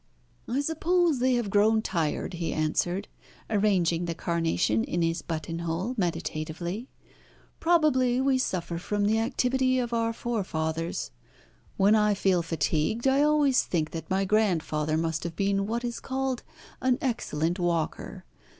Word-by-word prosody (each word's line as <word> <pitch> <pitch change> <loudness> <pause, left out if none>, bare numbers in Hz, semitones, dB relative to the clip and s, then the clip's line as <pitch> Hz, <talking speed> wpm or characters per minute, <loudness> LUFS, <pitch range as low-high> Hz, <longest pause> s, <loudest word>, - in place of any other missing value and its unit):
"I 260 +4 0
suppose 320 0 +1
they 255 0 +3
have 235 -5 -1
grown 220 +2 +4
tired," 165 -2 -1
he 170 -1 -3
answered, 175 +5 0 0.4
arranging 185 -5 +2
the 170 -1 -3
carnation 165 - 0
in 175 0 -1
his 165 0 0
buttonhole 165 +6 -3
meditatively. 175 +2 -3 0.7
"Probably 280 -7 +3
we 265 0 +2
suffer 170 -7 -2
from 205 +3 -1
the 220 +2 +2
activity 255 +2 +1
of 240 -2 -1
our 230 0 +1
forefathers. 165 - -3 0.7
When 200 +2 +5
I 210 -1 +3
feel 190 -3 +2
fatigued 160 - 0
I 270 +1 +4
always 295 -3 +4
think 155 -3 -2
that 165 - -6
my 195 +1 +1
grandfather 160 -7 +1
must 160 0 -1
have 170 -1 -5
been 195 +1 0
what 235 +2 -2
is 240 -1 -3
called 265 -1 -2 0.4
an 255 -1 +2
excellent 175 - -1
walker. 170 -2 -2
200 Hz, 140 wpm, -27 LUFS, 165-245 Hz, 0.7 s, When